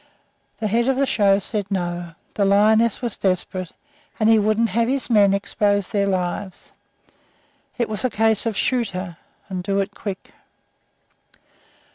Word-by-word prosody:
The 225 - -3
head 235 +4 +1
of 270 -1 +1
the 275 - +2
show 200 -6 +3
said, 200 0 -4
"No"; 175 -3 -3 0.2
the 205 - 0
lioness 215 +4 +3
was 235 -4 -3
desperate, 185 -1 -1 0.5
and 220 0 +3
he 225 -1 +6
wouldn't 215 +2 +1
have 230 +4 +1
his 265 -1 0
men 205 -3 +5
expose 200 0 0
their 200 -1 0
lives. 185 0 -3 1.1
It 235 - 0
was 215 -2 -5
a 255 - +2
case 220 0 +1
of 220 -3 -2
"Shoot 245 -4 +1
her, 180 -3 -6 0.3
and 185 -2 -4
do 195 +2 -1
it 195 - -2
quick." 195 -3 -7
205 Hz, 155 wpm, -22 LUFS, 195-225 Hz, 1.1 s, he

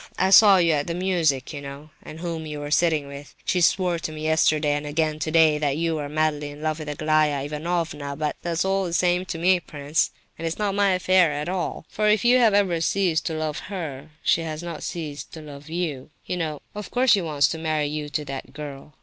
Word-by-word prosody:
I 190 +1 +2
saw 200 -1 +8
you 170 -2 +3
at 145 -2 0
the 170 - -2
music, 165 -7 0
you 145 - -6
know, 140 +2 -9
and 160 +2 -10
whom 165 -2 -4
you 150 -1 -5
were 145 0 -6
sitting 155 -3 +2
with. 140 0 -10
She 180 - +1
swore 175 0 +2
to 155 - -4
me 155 0 -7
yesterday, 155 -1 +2
and 145 0 -2
again 155 0 0
today, 155 0 +3
that 145 -1 0
you 165 -1 0
are 145 -1 -4
madly 150 -1 0
in 145 +1 -10
love 155 0 -1
with 155 -1 -6
Aglaya 150 -1 +1
Ivanovna. 150 -2 -3
But 150 0 -2
that's 170 +1 -1
all 195 0 +1
the 170 - -4
same 180 +1 +2
to 170 - -5
me, 180 +2 +3
prince, 150 -1 -1 0.3
and 165 - -2
it's 165 - -3
not 205 -2 0
my 200 -1 +3
affair 185 -2 +3
at 150 +2 -3
all; 180 -3 -3
for 215 0 -1
if 210 +1 +2
you 250 +1 +6
have 200 -7 +3
ceased 180 -3 +1
to 165 - -2
love 155 -1 -2
her, 155 -7 -6
she 165 - +3
has 160 0 -5
not 170 -3 -6
ceased 150 -4 -6
to 160 - -8
love 145 0 -11
you. 160 -6 -3 0.2
You 180 - -3
know, 155 -4 -3
of 210 -2 -7
course, 255 0 +3
that - - +9
she - - 0
wants 150 -4 +2
to 160 - -4
marry 155 -2 0
you 150 0 -4
to 150 +1 -3
that 135 -1 -7
girl? 145 0 -9
155 Hz, 235 wpm, -24 LUFS, 150-175 Hz, 0.3 s, that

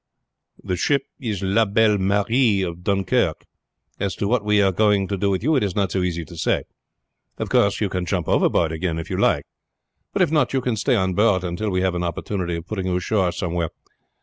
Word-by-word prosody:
"The 90 - -2
ship 140 +8 +1 0.2
is 110 -8 -3
La 100 +4 +3
Belle 105 0 +3
Marie 100 +2 +2
of 85 -1 -5
Dunkirk; 100 -1 0 0.5
as 100 -1 -2
to 100 - -2
what 120 0 +1
we 105 0 +2
are 100 -1 +4
going 100 0 +2
to 100 - -1
do 100 +1 0
with 95 +1 -1
you 155 +4 +2
it 135 - +2
is 100 -3 -2
not 100 -3 0
so 95 - 0
easy 85 -2 -2
to 85 - -12
say. 80 - 0 0.7
Of - - -4
course 100 0 +2
you 105 - +1
can 90 -2 -3
jump - - -1
overboard 80 -2 +2
again 80 0 -2
if 80 - -6
you - - -1
like, - - +2 0.7
but - - +2
if - - 0
not 150 -6 +2
you 135 - +1
can 125 -2 -1
stay 125 +4 +1
on 95 -3 +1
board 100 -2 +2
until 90 +4 -2
we 90 -1 0
have 95 -1 +1
an 90 0 -2
opportunity 85 +1 -3
of 85 0 -6
putting 95 -1 -4
you 90 - 0
ashore 90 0 +1
somewhere. 85 -2 -2
95 Hz, 225 wpm, -22 LUFS, 90-105 Hz, 0.7 s, are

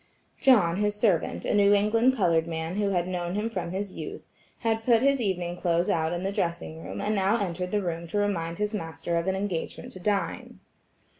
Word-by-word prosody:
John, 195 -10 +5
his 210 0 +1
servant, 205 -6 +1
a - - 0
New 205 0 +5
England 225 +5 +3
colored 170 -7 +2
man 165 +2 -3
who 205 -1 +1
had 180 -2 0
known 175 -1 -3
him 215 +2 -1
from 180 -5 -3
his 190 +2 -4
youth, - - -7 0.4
had 225 -1 0
put 230 0 +4
his 275 -1 +3
evening 180 -4 -1
clothes 175 +1 +1
out 160 -3 +1
in 175 +1 -3
the 195 - -1
dressing 170 - -3
room, 95 +3 -6
and 210 - 0
now 200 +3 +2
entered 180 -2 -2
the 205 0 0
room 170 -1 -3
to 175 - -3
remind 170 -5 -1
his 210 +1 -1
master 170 -2 -3
of 170 +2 -1
an 190 - +1
engagement 190 -4 -4
to 185 - -9
dine. 200 +1 -2
190 Hz, 210 wpm, -27 LUFS, 170-210 Hz, 0.4 s, John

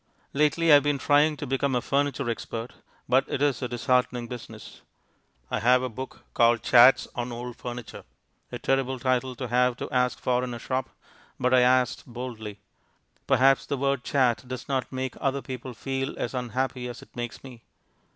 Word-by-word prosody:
Lately 150 +3 +3
I - - +10
have 145 -1 +7
been 145 -1 +1
trying 145 +2 +3
to 145 - -5
become 135 0 0
a - - +3
furniture 140 -1 0
expert, 115 0 -4 0.3
but 130 +2 +4
it - - -2
is 140 -4 +1
a 125 - -1
disheartening 125 0 0
business. 120 -1 -10 0.7
I - - 0
have 125 +3 +4
a 130 - -2
book 130 +3 -8
called 115 -1 +3
Chats 125 +2 +6
on 120 0 -4
Old 120 0 -6
Furniture 120 -1 -7 0.5
a - - -4
terrible 130 -1 0
title 130 0 0
to 125 +1 -5
have 125 +1 +2
to - - -4
ask 125 -1 +1
for 125 0 +1
in 125 -1 -4
a - - -5
shop, 130 +2 -3 0.5
but 125 0 +1
I 130 - +7
asked 125 0 +2
boldly. 115 -4 -7 0.7
Perhaps 135 0 +4
the 140 - -1
word 135 -1 0
"chat" 130 -5 +1
does 130 0 -6
not 135 -2 -2
make 130 -1 -3
other 135 0 0
people 130 -1 -7
feel 135 +2 -3
as 120 - -3
unhappy 125 0 -2
as 120 -1 -8
it - - -21
makes 120 -1 -6
me. 125 -4 -11
125 Hz, 185 wpm, -26 LUFS, 120-135 Hz, 0.7 s, I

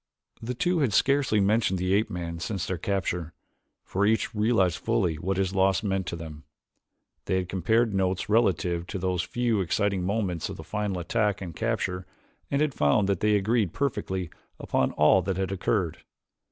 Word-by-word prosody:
The 125 +2 -4
two 175 +7 +1
had 130 -8 +1
scarcely 140 -5 +3
mentioned 100 -1 +2
the 90 +1 0
ape 105 +3 +2
man 85 -1 -5
since 95 0 -3
their 95 -2 -3
capture, 90 -4 -2 0.5
for 95 - -1
each 110 +2 +1
realized 105 -5 +2
fully 80 -3 0
what 95 +3 -1
his 95 -1 0
loss 95 +3 +2
meant 95 -3 -1
to 85 - -3
them. 80 -2 -9 0.8
They - - 0
had 95 -1 -1
compared 110 +5 +1
notes 95 -1 0
relative 90 -5 +1
to 100 - -4
those 90 -1 0
few 115 +1 0
exciting 100 +1 0
moments 95 -3 -1
of - - -7
the - - -8
final 105 -3 -2
attack 105 +3 0
and 90 -4 -7
capture 95 -5 -2 0.4
and 140 - +1
had 150 -2 +1
found 75 +5 +2
that 95 -3 +1
they 105 0 +3
agreed 105 -1 +1
perfectly 95 - -2 0.3
upon - - 0
all 75 +5 +5
that 90 +1 -2
had 95 0 -1
occurred. 95 -2 -1
95 Hz, 180 wpm, -27 LUFS, 90-110 Hz, 0.8 s, all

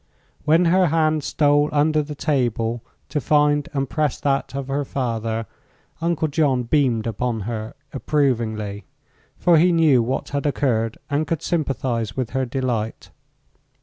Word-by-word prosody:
When 160 +4 +4
her 180 +2 +4
hand 155 -1 +1
stole 145 0 +2
under 150 +1 +2
the 150 0 -6
table 120 -6 -1 0.3
to 150 - -1
find 145 0 +2
and 135 -2 -1
press 150 0 -1
that 135 -1 0
of 140 -1 -4
her 140 +1 -1
father, 115 -4 -2 0.6
Uncle 165 -1 0
John 145 -4 +1
beamed 120 -4 +1
upon 115 0 -2
her 110 +1 -5 0.2
approvingly; 115 -8 -1 0.5
for 170 -3 +4
he 180 +2 +4
knew 160 -7 +4
what 130 +4 -2
had 140 +1 -1
occurred 115 -6 0
and 145 +2 0
could 165 0 -2
sympathize 130 - -2
with 125 -3 -2
her 130 0 -1
delight. 120 -4 -3
135 Hz, 145 wpm, -22 LUFS, 115-150 Hz, 0.6 s, When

